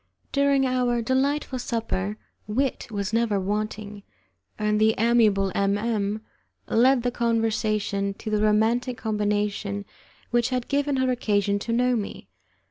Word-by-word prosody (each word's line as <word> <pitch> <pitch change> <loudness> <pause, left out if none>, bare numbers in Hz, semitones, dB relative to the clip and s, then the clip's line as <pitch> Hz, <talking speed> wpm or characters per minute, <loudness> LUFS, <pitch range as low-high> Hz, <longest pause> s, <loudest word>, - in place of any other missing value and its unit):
During 280 -1 +3
our 250 -2 +1
delightful 265 +2 0
supper 215 -4 -2 0.3
wit 255 +5 -1
was 205 -1 -3
never 230 -3 +2
wanting, 210 +1 -3 0.6
and 210 -1 +1
the 220 0 +4
amiable 215 -4 +3
M 200 0 +1
M 210 -1 -1 0.5
led 250 +2 +4
the 245 - 0
conversation 215 -4 0
to 215 - -6
the 210 -1 +1
romantic 225 +4 +2
combination 205 -1 -1 0.5
which 240 0 +2
had 250 -2 -2
given 285 0 0
her 260 -1 +1
occasion 205 -4 +1
to 230 - -4
know 250 +1 +2
me. 205 - -5
220 Hz, 130 wpm, -25 LUFS, 205-245 Hz, 0.6 s, the